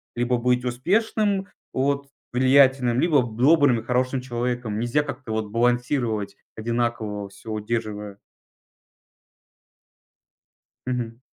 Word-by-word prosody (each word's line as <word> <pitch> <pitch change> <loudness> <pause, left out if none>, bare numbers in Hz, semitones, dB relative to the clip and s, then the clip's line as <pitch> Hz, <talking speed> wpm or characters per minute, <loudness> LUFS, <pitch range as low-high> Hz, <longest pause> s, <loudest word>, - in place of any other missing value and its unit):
либо 120 +1 +1
быть 125 +1 +1
успешным, 195 - 0 0.3
вот 140 +1 0 0.3
влиятельным, 130 -1 +4
либо 150 -5 +4
б 115 -2 -6
добрым 145 -5 +5
и - - -9
хорошим 125 +2 0
человеком. 120 -3 -3
Нельзя 120 +5 +1
как-то 130 -5 -7
вот 110 -1 -1
балансировать, 120 -3 0 0.2
одинаково 110 -3 -2
всё 105 +3 -10
удерживая. 105 -2 -3 2.7
Мгм. 120 -2 -3
120 Hz, 100 wpm, -24 LUFS, 115-130 Hz, 2.7 s, добрым